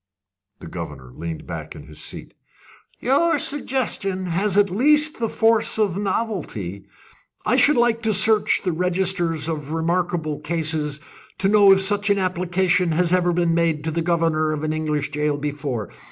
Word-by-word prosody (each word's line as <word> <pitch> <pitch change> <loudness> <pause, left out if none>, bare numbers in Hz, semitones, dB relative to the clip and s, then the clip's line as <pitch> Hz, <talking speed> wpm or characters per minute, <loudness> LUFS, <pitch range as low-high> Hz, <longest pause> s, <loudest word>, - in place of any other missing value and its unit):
The - - -9
governor 75 -7 -8
leaned 80 +2 -7
back 80 -2 -7
in 75 - -10
his 75 0 -10
seat. - - -6 0.7
"Your 290 +6 +2
suggestion 250 -10 -2
has 190 +3 0
at 200 -2 +3
least 300 +8 +3
the 230 -1 -1
force 225 -1 +2
of 205 -5 +1
novelty. 185 - -4 0.6
I - - +2
should 300 -1 +4
like 235 -1 +2
to 220 -1 0
search 210 +1 +3
the 180 - 0
registers 175 -2 0
of 155 -2 -4
remarkable 165 -2 -1
cases, 155 -2 -1 0.4
to 195 +1 +1
know 205 -1 +6
if 195 0 +5
such 205 +1 +1
an 200 - +3
application 180 -1 0
has 175 +2 +2
ever 180 -1 +2
been 170 -1 +1
made 165 -3 0
to 160 - -2
the 165 +2 -2
governor 165 -2 0
of 155 0 -5
an 155 0 -1
English 150 -2 -2
jail 150 -1 -1
before. 145 -6 -4
175 Hz, 165 wpm, -22 LUFS, 150-200 Hz, 0.7 s, know